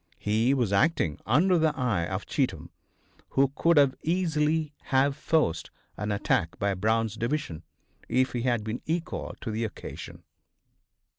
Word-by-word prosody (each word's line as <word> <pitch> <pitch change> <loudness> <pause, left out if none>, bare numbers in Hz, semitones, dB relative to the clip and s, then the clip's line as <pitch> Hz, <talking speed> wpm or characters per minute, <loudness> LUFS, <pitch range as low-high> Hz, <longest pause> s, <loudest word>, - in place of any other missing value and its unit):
He 110 +6 +2
was 120 -7 0
acting 100 - +2
under 170 +10 +4
the 155 -2 +1
eye 105 -10 0
of - - -4
Cheatham, - - -2 0.7
who 135 0 +5
could 145 -6 +4
easily 160 -3 0
have 135 +1 +2
forced 150 - 0 0.3
an 105 +1 -3
attack 85 -4 0
by 100 0 0
Brown's 110 +3 0
Division 115 - -2 0.5
if 130 +1 +2
he 120 - -1
had 120 -3 0
been 110 +3 -4
equal 165 +1 -3
to 115 - -4
the 110 +2 -2
occasion. 110 - -7
125 Hz, 140 wpm, -27 LUFS, 105-150 Hz, 0.7 s, who